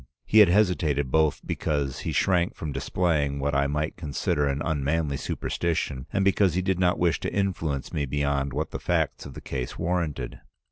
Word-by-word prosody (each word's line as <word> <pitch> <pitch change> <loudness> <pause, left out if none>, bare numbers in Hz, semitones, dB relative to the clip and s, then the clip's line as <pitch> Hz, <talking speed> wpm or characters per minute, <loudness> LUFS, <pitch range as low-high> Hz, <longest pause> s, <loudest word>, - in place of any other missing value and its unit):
He 110 - +5
had 105 -4 +8
hesitated 85 -9 +2
both 80 -1 +2
because 70 -3 -2
he - - -3
shrank 90 -2 +2
from 75 - -5
displaying 75 -3 0
what 70 +1 -1
I 70 0 +2
might 75 +2 -2
consider 75 -1 -1
an 70 0 -1
unmanly 75 -1 0
superstition, 75 -3 -2
and 100 -1 +1
because 95 -3 +3
he 95 - +2
did 95 -1 0
not 90 -1 +3
wish 85 -2 +2
to - - -3
influence 80 -8 -2
me 70 -2 -1
beyond 70 0 0
what 75 +4 -3
the - - -4
facts - - -1
of 65 - -11
the - - -8
case 65 -2 -4
warranted. 80 -7 -2
75 Hz, 185 wpm, -26 LUFS, 70-90 Hz, -, had